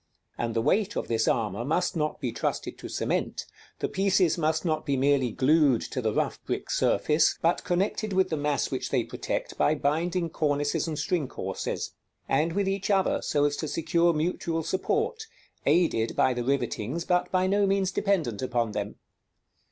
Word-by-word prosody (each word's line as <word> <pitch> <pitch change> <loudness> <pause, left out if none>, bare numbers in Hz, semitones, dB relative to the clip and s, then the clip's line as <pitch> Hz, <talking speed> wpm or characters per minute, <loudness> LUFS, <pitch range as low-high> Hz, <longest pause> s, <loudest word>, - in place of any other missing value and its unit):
And 115 -1 -3
the 115 - +1
weight 205 - +1
of - - -2
this 115 -1 +1
armor 110 -1 0
must 175 +8 0
not 155 -1 -1
be 125 -5 -2
trusted 115 - -3
to - - -7
cement; - - -2 0.3
the - - -1
pieces 190 -3 +2
must 160 0 0
not 155 -2 0
be 140 -1 0
merely 135 -1 +3
glued 140 -1 +3
to 130 - -2
the 110 -2 0
rough - - -1
brick - - -3
surface, 150 +1 +2
but 170 +2 +2
connected 200 +4 -1
with 190 0 +2
the - - +1
mass 145 -2 -1
which - - -2
they - - +1
protect - - -4
by 155 - +3
binding 165 +4 0
cornices 145 0 0
and 155 -2 -3
string 155 -1 0
courses; - - -4 0.3
and 155 +5 +1
with 200 +1 0
each 195 +1 -1
other, 195 -2 +2
so 145 -1 +1
as 145 0 +1
to 155 - -3
secure 170 +3 +2
mutual 165 0 -1
support, 440 - -1 0.4
aided 140 -10 +2
by 130 - +3
the 120 0 -3
rivetings, 135 +3 -1
but 180 -1 +1
by 185 0 +2
no 200 +1 +2
means 195 -1 +1
dependent 170 - 0
upon 120 -3 0
them. - - -4
160 Hz, 180 wpm, -27 LUFS, 135-185 Hz, 0.4 s, merely